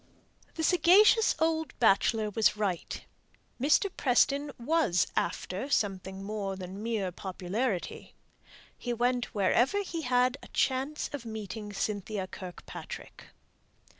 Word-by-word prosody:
The 320 - -3
sagacious 390 +7 +5
old 320 0 0
bachelor 215 -1 +3
was 210 0 +2
right. 195 -5 -2 0.6
Mr. 295 +8 +4
Preston 280 +3 +2
was 240 - +2
"after" 185 +8 -2
something 195 -5 -1
more 200 -1 -3
than 190 +1 -7
mere 215 -5 -1
popularity. 190 +3 -3 0.6
He 245 - -3
went 245 0 0
wherever 240 - +2
he 335 -3 -4
had 250 0 +2
a - - -12
chance 270 +3 0
of 285 -4 -5
meeting 215 -1 -6
Cynthia 205 -1 -2
Kirkpatrick. 185 -1 -9
225 Hz, 110 wpm, -30 LUFS, 195-280 Hz, 0.6 s, sagacious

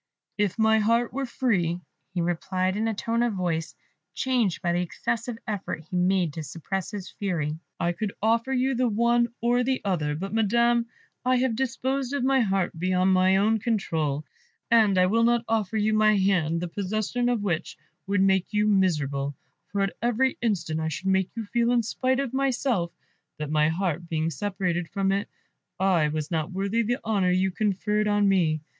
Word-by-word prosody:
"If 205 -1 +1
my 220 0 +4
heart 230 +3 +2
were 270 0 -2
free," 190 -10 0 0.4
he 175 - +1
replied, 185 +2 -1
in 220 +2 0
a 225 - 0
tone 230 +3 -1
of 240 -2 +1
voice 170 -4 -2 0.4
changed 240 -9 0
by 175 -1 +1
the 175 - +1
excessive 230 +6 -3
effort 200 -6 -4
he - - -3
made 180 -3 +2
to 160 - -5
suppress 170 +5 -4
his 200 -3 -7
fury, 160 -6 -2 0.2
"I 175 -1 +1
could 200 +4 -3
offer 230 +4 +1
you 265 +1 +1
the 250 0 +1
one 235 +2 +2
or 240 +1 +2
the 260 +1 0
other; 155 -7 0
but, 195 +6 -5
Madam, 235 +2 +2 0.4
I 255 0 +3
have 250 -2 +1
disposed 265 +2 -1
of 285 - -1
my 270 +1 +3
heart 195 -7 0
beyond 185 +1 +2
my 185 +1 +4
own 215 +3 +3
control, 160 - -1 0.5
and 215 -5 +5
I 185 - +5
will 220 +5 +2
not 235 0 +2
offer 220 -2 0
you 215 +1 +2
my 215 -1 +4
hand, 175 -4 +1
the 180 - -2
possession 215 +6 -1
of 235 -4 0
which 175 -4 -2 0.3
would 200 -1 +1
make 190 -1 +3
you 210 0 +2
miserable, 145 -9 +1 0.4
for 200 +1 -1
at 195 -1 0
every 245 +3 +1
instant 170 -9 -1
I 160 - -1
should 160 +5 -3
make 190 -1 +2
you 225 -2 -4
feel, 235 +3 +1
in 240 -1 +3
spite 255 +4 0
of 275 -3 -2
myself, 255 -9 0 0.5
that, 150 -1 -4
my 155 0 +3
heart 170 -1 -2
being 160 0 -1
separated 180 0 -2
from 195 -1 0
it, 200 +1 -1 0.5
I 185 -5 +3
was 155 +1 -3
not 160 0 -1
worthy 200 +5 0
the 240 +2 0
honour 200 -4 +2
you 185 +1 +2
conferred 210 +1 0
on 205 -1 +3
me. 165 -6 +2
200 Hz, 190 wpm, -26 LUFS, 175-230 Hz, 0.5 s, and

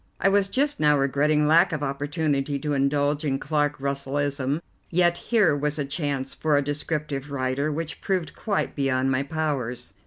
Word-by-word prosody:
I 195 - +4
was 200 0 +3
just 285 +7 0
now 150 -1 +4
regretting 145 +2 +2
lack 165 +5 +5
of 155 -2 -2
opportunity 145 0 -1
to 145 +1 -2
indulge 145 +2 +1
in 135 -3 0
Clark 145 0 0
Russellism, 140 +1 -1 0.3
yet 175 0 +2
here 210 -10 +4
was 150 +1 -1
a 145 - -1
chance 140 -2 -3
for 155 -2 +1
a - - +3
descriptive 145 -1 -3
writer 140 +2 -1
which 160 +1 -4
proved 185 -4 -1
quite 205 -3 -2
beyond 135 -2 +1
my 130 +1 +1
powers. 140 -7 -3
145 Hz, 165 wpm, -25 LUFS, 140-155 Hz, 0.3 s, lack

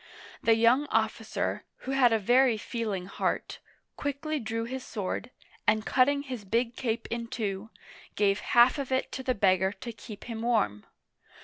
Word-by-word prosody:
The 225 - +4
young 240 +6 +4
officer, - - -1 0.2
who 265 - -2
had 265 -3 +5
a 225 - +4
very 245 +3 +4
feeling 215 -4 -3
heart, 195 - -2 0.4
quickly 290 +2 -2
drew 230 -1 -3
his 255 +2 -5
sword, 205 +1 -4 0.4
and 215 0 +3
cutting 280 +2 +3
his 255 -6 -6
big 230 +4 0
cape 230 -2 -2
in 235 0 -3
two, 220 -4 -3 0.5
gave 200 -1 +2
half 240 +4 +4
of 270 -2 -4
it 260 - 0
to 260 - -4
the 255 -1 0
beggar 190 -1 +3
to 235 +5 -7
keep 210 -1 -10
him 230 -2 -5
warm. 215 - 0
230 Hz, 165 wpm, -29 LUFS, 210-255 Hz, 0.5 s, had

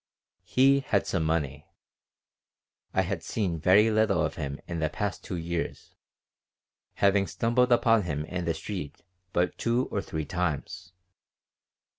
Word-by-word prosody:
He 135 +8 +4
had 105 -7 0
some 85 -4 -1
money. 75 -3 -1 1.2
I 95 - +2
had 95 -2 -3
seen 90 -2 -2
very 105 +7 +5
little 110 -2 +2
of - - -3
him 70 0 -5
in 85 -1 -3
the 80 -1 0
past 105 +3 -3
two - - -5
years, 85 0 -4 1.0
having 100 0 +3
stumbled 125 +2 +1
upon 115 -2 +5
him 75 -5 -3
in 90 +1 -4
the 85 -1 0
street 85 -3 -6 0.3
but 90 0 0
two 120 +2 +1
or 100 - -1
three 80 -5 -4
times. 90 +2 -3
90 Hz, 140 wpm, -28 LUFS, 80-105 Hz, 1.2 s, very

